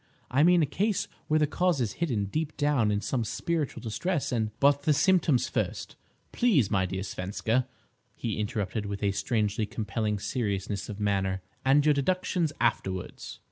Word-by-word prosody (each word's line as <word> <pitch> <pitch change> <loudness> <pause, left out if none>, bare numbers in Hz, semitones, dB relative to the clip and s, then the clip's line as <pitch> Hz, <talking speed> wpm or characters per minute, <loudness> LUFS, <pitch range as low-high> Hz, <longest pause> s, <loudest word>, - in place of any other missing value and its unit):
I 130 +3 +3
mean 175 +1 +5
a - - +4
case 205 +6 0 0.2
where 155 - +3
the 155 - +4
cause 175 +1 +1
is 110 -5 -1
hidden 120 -12 0
deep 155 +9 -3
down 145 -7 +2
in 105 0 0
some 125 0 -1
spiritual 155 +6 -2
distress, 150 - -1
and—" 110 -3 0
"But 140 0 +4
the 150 +1 +3
symptoms 160 - +3
first, - - -3 0.4
please, 180 - +3
my 95 -2 +2
dear 95 +1 -3
Svenska," 110 +7 -1 0.5
he 110 -3 -3
interrupted, 105 -1 -2
with 100 +1 -5
a 100 - +3
strangely 105 0 0
compelling 110 -1 -2
seriousness 100 -3 -2
of 105 -1 -6
manner, 95 -2 0 0.2
"and 140 +2 +4
your 150 - +5
deductions 170 +2 0
afterwards." 95 -6 -2
120 Hz, 165 wpm, -28 LUFS, 105-150 Hz, 0.5 s, mean